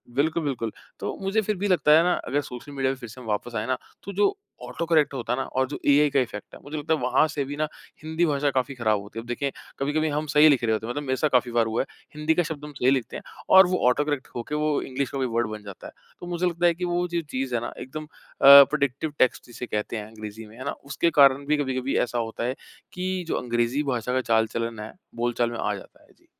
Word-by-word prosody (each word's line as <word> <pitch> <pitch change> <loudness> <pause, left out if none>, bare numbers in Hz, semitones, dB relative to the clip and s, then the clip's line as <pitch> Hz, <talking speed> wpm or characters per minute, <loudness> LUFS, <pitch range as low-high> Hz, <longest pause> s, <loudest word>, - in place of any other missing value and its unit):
बिल्कुल, 160 +4 +1
बिल्कुल। 120 -6 -2 0.3
तो - - -4
मुझे 195 +3 +1
फिर 215 0 -1
भी 200 +3 -1
लगता 180 -5 +3
है 165 - +5
ना 180 - +3
अगर 145 +3 +1
सोशल 125 +1 -9
मीडिया 135 -2 0
पर - - -9
फिर 120 -3 -9
से 115 - -11
हम 120 - -11
वापस 110 +3 -2
आए 105 0 -1
न, 130 - +2 0.3
तो 200 - -7
जो 205 - +2 0.3
ऑटोकरेक्ट 155 +3 +1
होता 125 -2 -2
है - - -1
ना, - - 0
और 130 0 -1
जो 145 - -5
एआई 145 +1 +5
का 140 0 +2
इफ़ेक्ट 115 -5 -4
है - - -12
मुझे 150 +2 -6
लगता 155 +2 0
है 160 - 0
वहाँ 130 +5 +3
से 150 -2 -2
भी 145 +2 -5
ना 155 0 0 0.4
हिंदी 160 +2 0
भाषा 145 -2 +1
काफ़ी 135 +1 -1
खराब 110 -4 +1
होती 105 +3 -8
है। - - -7
अब - - -16
देखिए 135 +3 -2 0.3
कभी-कभी 150 +3 0
हम 150 +1 -1
सही 150 +1 +7
लिख 135 -5 +3
रहे 110 -1 +2
होते 110 0 -2
हैं। - - -2
मतलब 145 +4 -4
मेरे 130 -2 0
साथ 155 - +1
काफ़ी 125 -1 +3
बार 120 -1 +2
हुआ 115 +1 0
है। - - -4 0.3
हिंदी 150 +1 +1
का 175 - +3
शब्द 150 -2 -6
हम 150 - -8
सही 125 - +4
लिखते 130 -4 -1
हैं - - -10 0.3
और 190 -1 +9
वो 185 0 0
ऑटोकरेक्ट 145 +1 -1
हो 120 - -3
के - - 0
वो 150 -1 +1
इंग्लिश 135 0 -3
का - - -5
कोई 130 -1 0
वर्ड 120 -1 +2
बन 105 -1 -7
जाता 100 -2 -10
है। - - -12 0.3
तो 175 - -8
मुझे 175 0 -1
लगता 175 0 0
है 170 - +5
कि 180 +2 -4
वो 175 0 0
जो 170 -1 -1
चीज़ 130 -1 -2
है 115 - 0
ना 120 - -4
एकदम 155 +4 -7
अ, - - -21 0.4
प्रिडिक्टिव 140 +1 +7
टेक्स्ट 130 - +2
जिसे 120 +1 -7
कहते 105 0 -3
हैं 105 - -5
अंग्रेजी 110 0 -9
में, 110 +2 -15
है 130 - -8
ना? 140 - -1
उसके 140 +4 -1
कारण 140 0 +6
भी 150 +1 +2
कभी-कभी 130 -2 -1
ऐसा 120 - -4
होता 115 0 -3
है 125 +2 -1 0.4
कि 185 0 -2
जो - - -1
अंग्रेजी 120 +3 0
भाषा 125 +1 -2
का 130 - +2
चाल 110 0 +4
चलन 115 -1 -3
है 105 +1 -7 0.2
बोल-चाल 120 0 0
में 120 - -5
आ - - 0
जाता - - -14
है। - - -24
जी। - - -30
135 Hz, 275 wpm, -25 LUFS, 120-155 Hz, 0.4 s, और